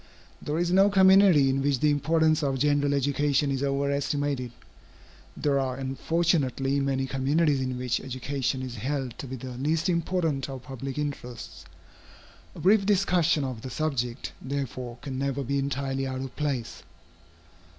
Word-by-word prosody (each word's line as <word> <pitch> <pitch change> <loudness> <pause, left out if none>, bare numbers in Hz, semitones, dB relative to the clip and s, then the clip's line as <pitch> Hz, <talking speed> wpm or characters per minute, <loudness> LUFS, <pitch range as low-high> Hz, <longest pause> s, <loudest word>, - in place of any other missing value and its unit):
There 150 +1 -2
is 175 +1 0
no 195 +2 +5
community 190 -6 +6
in 135 +1 0
which 140 -2 +1
the 150 +2 +3
importance 155 +2 +2
of 135 -2 0
general 145 +1 +2
education 140 +1 +1
is 135 -1 -1
over 140 0 0
estimated; 140 -3 -1 0.9
there 140 -2 +1
are 130 -1 -1
unfortunately 135 0 0
many 135 -1 0
communities 140 +2 +1
in 130 -1 -2
which 125 -1 -1
education 130 0 -3
is 125 -2 -6
held 130 +1 -3
to 140 - -6
be 130 - -5
the 130 +1 -7
least 155 +6 0
important 170 -5 0
of 130 -2 -7
public 135 0 -6
interests. 140 -5 -6 0.9
A - - -9
brief 200 +2 +4
discussion 180 -6 +2
of 130 -4 -4
the 130 - -6
subject, 125 -4 -2
therefore, 130 -3 -4
can 130 -2 -4
never 140 0 -1
be 140 +2 -1
entirely 135 -1 -2
out 130 0 -4
of 135 -1 -7
place. 140 -6 -3
140 Hz, 155 wpm, -27 LUFS, 130-150 Hz, 0.9 s, community